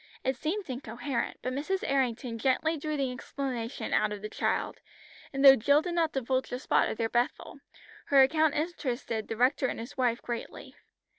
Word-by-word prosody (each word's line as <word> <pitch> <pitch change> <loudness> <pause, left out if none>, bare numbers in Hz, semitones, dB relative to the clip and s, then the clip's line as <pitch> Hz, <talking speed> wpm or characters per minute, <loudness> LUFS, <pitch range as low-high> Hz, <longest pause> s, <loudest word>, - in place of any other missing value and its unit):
It 260 +1 0
seemed 340 - -3
incoherent, 245 0 -3
but 255 - -2
Mrs. 310 +8 -2
Errington 245 -3 -1
gently 270 +6 +1
drew 305 0 -3
the 270 -2 0
explanation 250 -2 -4
out 215 0 +2
of 205 -1 -6
the 215 - -4
child, - - -1 0.5
and 275 0 +1
though 270 0 +11
Jill 285 +6 +3
did 350 -1 -3
not 330 -2 +1
divulge 260 0 -1
the 250 - -3
spot 255 - +2
of - - -4
their 225 - 0
"Bethel," 240 +4 -2 0.5
her 275 -1 +6
account 310 +2 +2
interested 255 -8 -2
the 225 - -4
rector 260 +2 +3
and - - -4
his 235 +4 -8
wife 245 -2 +1
greatly. 240 -1 -6
265 Hz, 180 wpm, -29 LUFS, 240-290 Hz, 0.5 s, though